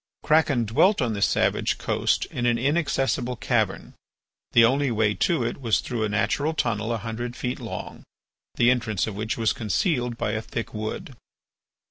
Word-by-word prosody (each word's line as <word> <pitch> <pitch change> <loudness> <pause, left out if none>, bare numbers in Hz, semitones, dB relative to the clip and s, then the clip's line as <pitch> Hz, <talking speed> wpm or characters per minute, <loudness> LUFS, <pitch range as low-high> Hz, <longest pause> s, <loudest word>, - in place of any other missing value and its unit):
Kraken 150 -6 +3
dwelt 185 - +3
on 120 -4 0
this 100 -1 +2
savage - - +1
coast - - 0
in 120 0 -1
an 120 -1 +2
inaccessible 135 -2 0
cavern. - - -1 0.6
The 115 -1 +7
only 135 +3 +2
way 110 -3 +1
to 160 - +1
it 120 +4 -3
was 110 -8 +2
through 120 -3 -3
a 110 - 0
natural 140 +9 0
tunnel 115 -5 -1
a 115 - 0
hundred 115 +3 -5
feet 125 0 -3
long, - - -7 0.5
the 120 +1 +4
entrance 110 -6 0
of 110 - -5
which 110 +2 -3
was 115 -2 +1
concealed 120 - -1
by 105 - -1
a 110 0 -2
thick 115 +1 -5
wood. 110 +4 -5
120 Hz, 170 wpm, -25 LUFS, 110-130 Hz, 0.6 s, The